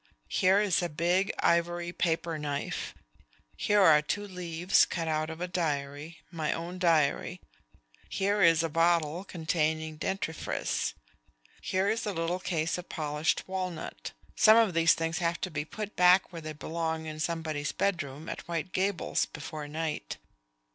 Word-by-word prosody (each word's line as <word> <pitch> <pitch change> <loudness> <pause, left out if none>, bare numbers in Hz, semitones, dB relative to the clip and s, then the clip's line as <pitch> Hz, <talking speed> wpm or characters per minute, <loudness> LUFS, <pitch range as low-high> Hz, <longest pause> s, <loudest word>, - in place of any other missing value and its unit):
"Here 190 +2 +4
is 205 -4 +2
a 175 - -1
big 175 +5 +1
ivory 175 +1 +1
paper 165 -2 -1
knife; 145 -1 -3 0.6
here 205 0 +2
are 155 -4 +7
two 205 +7 -3
leaves 180 -1 +2
cut 165 -2 -2
out 155 0 0
of 160 0 -7
a 180 - -1
diary 150 -2 -3
my 160 -3 -1
own 175 +2 -6
diary; 170 0 +2 0.7
here 200 +2 0
is 165 -2 +5
a - - +1
bottle 165 +1 +2
containing 160 -3 -1
dentifrice; 170 -1 -2 0.7
here 190 +1 0
is 220 +1 0
a 205 - -1
little 165 +1 -1
case 165 -1 -1
of 180 - -10
polished 150 0 -1
walnut. 185 - -5 0.2
Some 220 +1 +7
of 225 -5 +4
these 165 0 +5
things 165 0 -2
have 170 0 0
to 185 - -3
be 150 -1 -3
put 215 +3 -6
back 180 +1 +5
where 165 - -6
they 155 0 -6
belong 160 +1 -3
in 155 -1 -6
somebody's 155 -2 -2
bedroom 155 -6 -2
at - - -6
White 170 +1 -3
Gables 190 -1 0
before 155 -2 -7
night. 155 - -4
165 Hz, 155 wpm, -29 LUFS, 155-180 Hz, 0.7 s, are